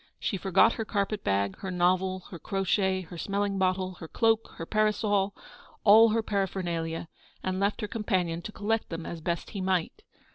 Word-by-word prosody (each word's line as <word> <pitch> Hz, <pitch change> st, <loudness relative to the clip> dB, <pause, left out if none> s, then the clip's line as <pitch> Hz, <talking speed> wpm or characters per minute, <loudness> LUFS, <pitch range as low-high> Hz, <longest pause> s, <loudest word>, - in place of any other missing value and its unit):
She -, -, -1 dB
forgot 195 Hz, +4 st, +4 dB
her 225 Hz, -, -3 dB
carpet 205 Hz, -1 st, -2 dB
bag, 100 Hz, 0 st, 0 dB
her 190 Hz, -, -5 dB
novel, 185 Hz, +1 st, +1 dB
her 175 Hz, -, -7 dB
crochet, 190 Hz, 0 st, 0 dB
her 175 Hz, -1 st, -9 dB
smelling 200 Hz, +1 st, -1 dB
bottle, 185 Hz, 0 st, +1 dB
her 165 Hz, -, -7 dB
cloak, 225 Hz, +4 st, +1 dB
her 165 Hz, -, -6 dB
parasol 205 Hz, -1 st, +1 dB, 0.2 s
— -, -, -24 dB
all 220 Hz, +2 st, +8 dB
her 225 Hz, +1 st, +1 dB
para 200 Hz, -2 st, 0 dB
phernalia: 170 Hz, -3 st, -3 dB, 0.4 s
and 185 Hz, 0 st, -1 dB
left 200 Hz, +1 st, 0 dB
her 210 Hz, -, -2 dB
companion 185 Hz, -6 st, -1 dB
to 210 Hz, -, -7 dB
collect 215 Hz, +1 st, -1 dB
them 165 Hz, -1 st, -5 dB
as 170 Hz, -1 st, -6 dB
best 170 Hz, +1 st, -3 dB
he 200 Hz, -, -4 dB
might. 185 Hz, -, -1 dB
190 Hz, 185 wpm, -28 LUFS, 175-210 Hz, 0.4 s, all